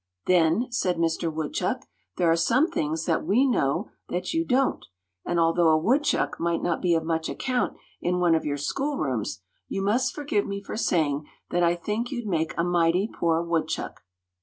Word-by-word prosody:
"Then," 175 Hz, +5 st, +3 dB
said 185 Hz, -7 st, 0 dB
Mister 165 Hz, 0 st, 0 dB
Woodchuck, 155 Hz, -1 st, -2 dB, 0.3 s
"there 170 Hz, -2 st, +3 dB
are -, -, +4 dB
some 235 Hz, -, +3 dB
things 160 Hz, +2 st, -1 dB
that 165 Hz, -, +1 dB
we 245 Hz, +7 st, +3 dB
know 140 Hz, -, 0 dB, 0.2 s
that 180 Hz, -, -2 dB
you 325 Hz, 0 st, +1 dB
don't; 265 Hz, -3 st, +1 dB, 0.4 s
and 175 Hz, -, +1 dB
although 165 Hz, +1 st, +3 dB
a 155 Hz, -, +5 dB
woodchuck 260 Hz, -, +1 dB
might 170 Hz, 0 st, 0 dB
not 170 Hz, -2 st, 0 dB
be 175 Hz, -2 st, +3 dB
of 160 Hz, -, 0 dB
much 160 Hz, 0 st, -1 dB
account 255 Hz, -2 st, -1 dB, 0.2 s
in 180 Hz, +1 st, 0 dB
one 175 Hz, -2 st, +4 dB
of 160 Hz, -, +2 dB
your 145 Hz, -1 st, -2 dB
schoolrooms, 145 Hz, -, -2 dB, 0.3 s
you 195 Hz, -, -3 dB
must 240 Hz, +6 st, +1 dB
forgive 280 Hz, -9 st, -1 dB
me 200 Hz, 0 st, -3 dB
for 200 Hz, -, -7 dB
saying 155 Hz, -9 st, 0 dB, 0.2 s
that 175 Hz, -, +1 dB
I 170 Hz, 0 st, +3 dB
think 215 Hz, +8 st, -3 dB
you'd 240 Hz, -4 st, -4 dB
make 165 Hz, -5 st, -1 dB
a 170 Hz, -, +2 dB
mighty 175 Hz, +2 st, +2 dB
poor 165 Hz, 0 st, +1 dB
woodchuck." 170 Hz, -1 st, -2 dB
175 Hz, 185 wpm, -26 LUFS, 165-215 Hz, 0.4 s, a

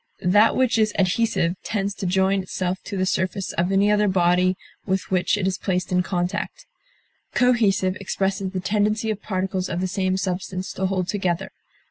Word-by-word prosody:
That 205 Hz, +5 st, +5 dB
which 255 Hz, -3 st, +2 dB
is 215 Hz, -1 st, +2 dB
adhesive 185 Hz, -2 st, +1 dB
tends 200 Hz, -1 st, -2 dB
to 195 Hz, -, -4 dB
join 190 Hz, +1 st, +2 dB
itself 185 Hz, 0 st, -3 dB
to 200 Hz, -, -4 dB
the 185 Hz, -, +1 dB
surface 185 Hz, +1 st, -1 dB
of 175 Hz, +2 st, 0 dB
any 200 Hz, +2 st, +3 dB
other 210 Hz, 0 st, +3 dB
body 180 Hz, 0 st, +3 dB, 0.3 s
with 190 Hz, -1 st, -2 dB
which 185 Hz, +2 st, +2 dB
it 195 Hz, -, -1 dB
is 190 Hz, 0 st, -1 dB
placed 180 Hz, -2 st, -1 dB
in 180 Hz, 0 st, +3 dB
contact; 180 Hz, -1 st, -3 dB, 0.7 s
cohesive 210 Hz, -7 st, +3 dB
expresses 195 Hz, 0 st, -2 dB
the 185 Hz, 0 st, -3 dB
tendency 210 Hz, +3 st, 0 dB
of 210 Hz, -1 st, -5 dB
particles 190 Hz, -1 st, -2 dB
of 175 Hz, -, -2 dB
the 185 Hz, -, 0 dB
same 185 Hz, 0 st, 0 dB
substance 185 Hz, 0 st, -3 dB
to 190 Hz, -, -1 dB
hold 185 Hz, -2 st, -1 dB
together. 190 Hz, -2 st, -1 dB
190 Hz, 175 wpm, -23 LUFS, 185-205 Hz, 0.7 s, That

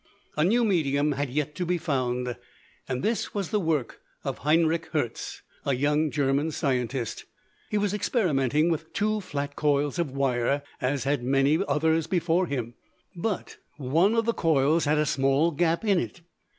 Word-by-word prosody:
A 150 Hz, -, +2 dB
new 230 Hz, +7 st, +3 dB
medium 150 Hz, -7 st, +2 dB
had 140 Hz, 0 st, -2 dB
yet 150 Hz, +2 st, -2 dB
to 180 Hz, -, -3 dB
be 175 Hz, 0 st, 0 dB
found, 125 Hz, -6 st, -1 dB, 0.5 s
and 125 Hz, 0 st, -2 dB
this 225 Hz, 0 st, -1 dB
was 195 Hz, -4 st, -2 dB
the 210 Hz, -, +2 dB
work 160 Hz, -8 st, -1 dB, 0.2 s
of -, -, -4 dB
Heinrich 160 Hz, +3 st, +2 dB
Hertz, 135 Hz, -7 st, -3 dB, 0.2 s
a 140 Hz, -, +1 dB
young 150 Hz, +4 st, +1 dB
German 140 Hz, +1 st, +1 dB
scientist. 125 Hz, -5 st, -2 dB, 0.4 s
He 210 Hz, -, 0 dB
was 205 Hz, -1 st, 0 dB
experimenting 160 Hz, -, +1 dB
with 160 Hz, 0 st, -4 dB
two 215 Hz, +1 st, 0 dB
flat 145 Hz, -5 st, -4 dB
coils 145 Hz, +2 st, +1 dB
of 170 Hz, -4 st, 0 dB
wire, 135 Hz, 0 st, 0 dB, 0.2 s
as 135 Hz, +1 st, 0 dB
had 140 Hz, -1 st, 0 dB
many 135 Hz, +5 st, +2 dB
others 160 Hz, +2 st, +1 dB
before 175 Hz, 0 st, +1 dB
him, 120 Hz, -5 st, -3 dB, 0.4 s
but 190 Hz, +2 st, -3 dB, 0.2 s
one 160 Hz, -, +2 dB
of 230 Hz, -1 st, +2 dB
the 230 Hz, -, +1 dB
coils 160 Hz, -1 st, +2 dB
had 150 Hz, +1 st, +2 dB
a 150 Hz, -, +2 dB
small 140 Hz, +2 st, +2 dB
gap 170 Hz, +5 st, 0 dB
in 200 Hz, -4 st, +3 dB
it. 175 Hz, -, -5 dB
150 Hz, 165 wpm, -26 LUFS, 135-170 Hz, 0.5 s, new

